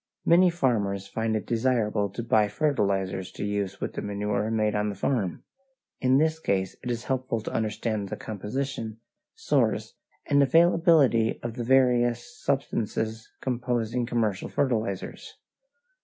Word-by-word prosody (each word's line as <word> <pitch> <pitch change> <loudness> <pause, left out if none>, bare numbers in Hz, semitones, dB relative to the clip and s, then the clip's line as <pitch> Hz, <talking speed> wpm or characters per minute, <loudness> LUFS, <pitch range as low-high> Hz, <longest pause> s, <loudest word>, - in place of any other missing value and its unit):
Many 180 +2 +6
farmers 105 - 0
find 110 +2 -1
it 110 - -2
desirable 115 -4 +1
to 115 +5 -5
buy 110 -3 +3
fertilizers 100 -7 0
to - - -4
use 100 -1 -2
with - - -4
the - - -4
manure 105 +1 -1
made 110 -1 +1
on 105 0 0
the 100 - -4
farm. 100 -3 -1 0.6
In 130 0 +3
this 160 +2 +2
case 95 - -1
it 125 - -4
is 120 -1 -2
helpful 130 -3 -1
to - - -6
understand 110 -1 -2
the - - -3
composition, 110 +1 -4 0.4
source, 450 - 0 0.3
and 140 0 +3
availability 160 -6 +4
of 120 -1 -3
the 120 0 -4
various 125 - +2
substances 110 -5 -2
composing 120 -2 -1
commercial 110 -5 -1
fertilizers. 110 -8 -2
115 Hz, 140 wpm, -27 LUFS, 105-130 Hz, 0.6 s, Many